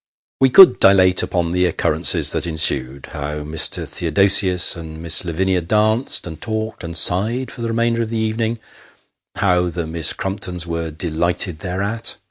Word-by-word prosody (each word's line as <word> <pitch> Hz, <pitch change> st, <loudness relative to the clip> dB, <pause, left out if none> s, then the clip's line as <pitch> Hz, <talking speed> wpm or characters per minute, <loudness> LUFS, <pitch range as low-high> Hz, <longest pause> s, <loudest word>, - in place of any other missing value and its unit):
We 135 Hz, -, +3 dB
could 185 Hz, +8 st, +6 dB
dilate 95 Hz, -2 st, +4 dB
upon 85 Hz, -2 st, -3 dB
the 90 Hz, +1 st, 0 dB
occurrences 85 Hz, -, +1 dB
that -, -, -2 dB
ensued. 70 Hz, -4 st, +2 dB
How 75 Hz, 0 st, -6 dB
Mr. 75 Hz, +1 st, -1 dB
Theodosius 90 Hz, +2 st, +3 dB
and 80 Hz, -2 st, -10 dB
Miss 80 Hz, +1 st, +2 dB
Lavinia 90 Hz, +2 st, -2 dB
danced, 110 Hz, +8 st, 0 dB
and 80 Hz, -3 st, -10 dB
talked, 110 Hz, -2 st, -5 dB
and 85 Hz, -1 st, -5 dB
sighed 115 Hz, +8 st, +2 dB
for -, -, -10 dB
the 115 Hz, -, -4 dB
remainder 115 Hz, 0 st, -1 dB
of 115 Hz, -, -4 dB
the 115 Hz, -, -4 dB
evening 110 Hz, +1 st, -3 dB, 0.8 s
how 90 Hz, -3 st, 0 dB
the 85 Hz, 0 st, -5 dB
Miss 80 Hz, -1 st, 0 dB
Crumptons 95 Hz, -3 st, -4 dB
were 85 Hz, -1 st, -5 dB
delighted 85 Hz, +2 st, -2 dB
thereat. 100 Hz, +7 st, -3 dB
90 Hz, 155 wpm, -17 LUFS, 85-110 Hz, 0.8 s, could